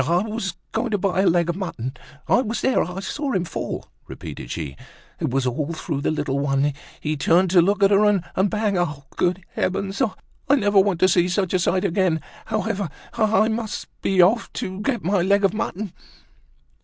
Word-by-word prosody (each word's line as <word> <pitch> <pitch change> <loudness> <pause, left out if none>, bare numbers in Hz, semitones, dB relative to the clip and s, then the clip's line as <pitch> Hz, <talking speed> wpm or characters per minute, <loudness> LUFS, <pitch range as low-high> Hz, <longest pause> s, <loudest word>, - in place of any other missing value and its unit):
"I 175 +3 +3
was 215 -4 -3 0.2
going 245 - -1
to 210 - +1
buy 190 -1 +1
a 195 - +3
leg 170 0 +3
of 170 - -1
mutton; 150 - -4 0.3
I 245 - +4
was 230 -1 -3
there, 260 - +3
I 180 +3 -3
saw 280 +6 -3
him 180 -2 0
fall," - - -4 0.2
repeated - - -8
she. 75 -5 -4 0.4
"It - - -1
was 135 +1 0
all 145 +6 -1
through 155 -3 -3
the - - 0
little 140 -3 -1
one; 140 0 +1 0.3
he 155 0 -2
turned 170 +6 +3
to 180 -2 +7
look 200 +3 +2
at 195 - +5
her, 200 +1 +5
and 205 -4 +3 0.3
bang! 210 -3 0
Ah! 145 -5 -2
good 180 +1 0
heavens! 195 +1 -1 0.5
I 285 - +7
never 205 -6 +4
want 190 -3 +2
to 185 - +7
see 175 -1 +3
such 185 0 0
a 185 - +3
sight 185 +2 +1
again. 180 -3 +2 0.3
However, 200 -5 -1 0.2
I 220 -2 +3
must 220 -1 -3
be 190 -2 +4
off 220 +6 +2
to 190 -5 -4
get 240 +2 -1
my 190 +2 +2
leg 200 +2 +3
of 195 - +2
mutton." 210 -3 -3
190 Hz, 200 wpm, -23 LUFS, 170-205 Hz, 0.5 s, to